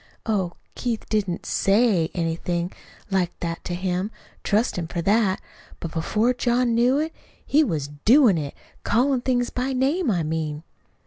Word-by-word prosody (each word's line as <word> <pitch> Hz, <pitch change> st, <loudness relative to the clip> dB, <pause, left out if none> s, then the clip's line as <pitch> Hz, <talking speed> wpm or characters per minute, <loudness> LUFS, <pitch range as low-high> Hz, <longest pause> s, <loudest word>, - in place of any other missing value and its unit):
Oh, 190 Hz, -6 st, 0 dB, 0.2 s
Keith 235 Hz, -3 st, -3 dB
didn't 195 Hz, -5 st, -1 dB
SAY 195 Hz, -5 st, +3 dB
anything 170 Hz, +1 st, -1 dB, 0.4 s
like 185 Hz, -2 st, 0 dB
that 170 Hz, -1 st, -4 dB
to 175 Hz, -, -2 dB
him 185 Hz, +2 st, -1 dB, 0.3 s
trust 220 Hz, +4 st, +1 dB
him 170 Hz, -2 st, -3 dB
for 175 Hz, -, -4 dB
that. 200 Hz, 0 st, +3 dB, 0.4 s
But 165 Hz, -, -5 dB
before 215 Hz, +9 st, +1 dB
John 245 Hz, -1 st, +1 dB
knew 245 Hz, +4 st, +3 dB
it, 315 Hz, +2 st, -1 dB, 0.3 s
he 300 Hz, +3 st, +4 dB
was 155 Hz, -, -1 dB, 0.2 s
DOIN' 235 Hz, -, +6 dB
it 145 Hz, -2 st, -5 dB, 0.3 s
callin' 255 Hz, +2 st, +2 dB
things 245 Hz, -1 st, 0 dB
by 255 Hz, +2 st, -1 dB
name, 275 Hz, +5 st, +1 dB
I 175 Hz, -6 st, +1 dB
mean. 155 Hz, -1 st, -3 dB
205 Hz, 150 wpm, -24 LUFS, 170-245 Hz, 0.4 s, DOIN